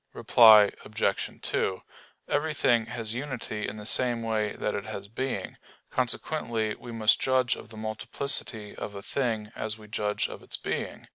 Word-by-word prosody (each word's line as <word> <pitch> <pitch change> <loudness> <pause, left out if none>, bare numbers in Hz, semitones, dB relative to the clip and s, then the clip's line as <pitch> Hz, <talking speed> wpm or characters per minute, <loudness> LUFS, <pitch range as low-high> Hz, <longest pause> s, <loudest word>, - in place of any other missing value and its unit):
Reply 110 -3 +7
Obj. - - -1
2: 95 - 0 0.5
Everything 145 -6 +2
has 115 -2 -4
unity 125 -5 -4
in - - -5
the 105 - -8
same 120 0 +3
way 110 -2 0
that 105 - -2
it 100 0 -3
has 100 -1 -6
being; 130 +5 -4 0.3
consequently 120 -3 -1
we 120 - -10
must 110 -2 +3
judge 130 -2 +2
of - - -11
the 110 - -11
multiplicity 110 0 -2
of 105 - -6
a 100 - -7
thing 110 -6 -2
as 110 0 -3
we 105 -1 -13
judge 105 -1 -1
of - - -9
its - - -1
being. - - -4
110 Hz, 160 wpm, -28 LUFS, 105-125 Hz, 0.5 s, Reply